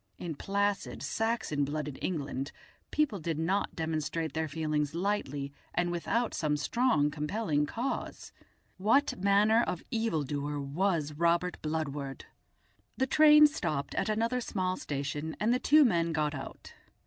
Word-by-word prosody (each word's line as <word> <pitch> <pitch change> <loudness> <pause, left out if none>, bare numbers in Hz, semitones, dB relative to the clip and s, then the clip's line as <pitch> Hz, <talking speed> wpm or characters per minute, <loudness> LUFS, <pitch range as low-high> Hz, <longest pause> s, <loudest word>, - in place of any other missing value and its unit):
In 170 -2 -4
placid 200 +5 -1
Saxon 225 -10 -1
blooded 150 0 -3
England 145 -5 -3 0.4
people 290 -10 0
did 160 -1 -2
not 185 +5 0
demonstrate 160 0 -2
their 160 0 -1
feelings 150 0 -1
lightly 145 -7 -2 0.2
and 175 0 +1
without 230 +7 -1
some 150 -2 0
strong 150 - +2
compelling 150 0 -1
cause. 240 - -4 0.4
What 225 +9 +2
manner 205 +3 +4
of 180 -7 -2
evildoer 150 - -1
was 150 +1 -1
Robert 170 +3 +1
Bludward? 145 -3 -3 0.7
The 265 - +2
train 300 +2 +7
stopped 155 - -1
at - - -1
another 230 +4 0
small 185 -5 -1
station, 145 +1 -4
and 225 +3 +2
the 250 - +1
two 300 +2 +6
men 170 -7 +1
got 150 -1 0
out. 135 -2 -8
165 Hz, 135 wpm, -30 LUFS, 150-215 Hz, 0.7 s, train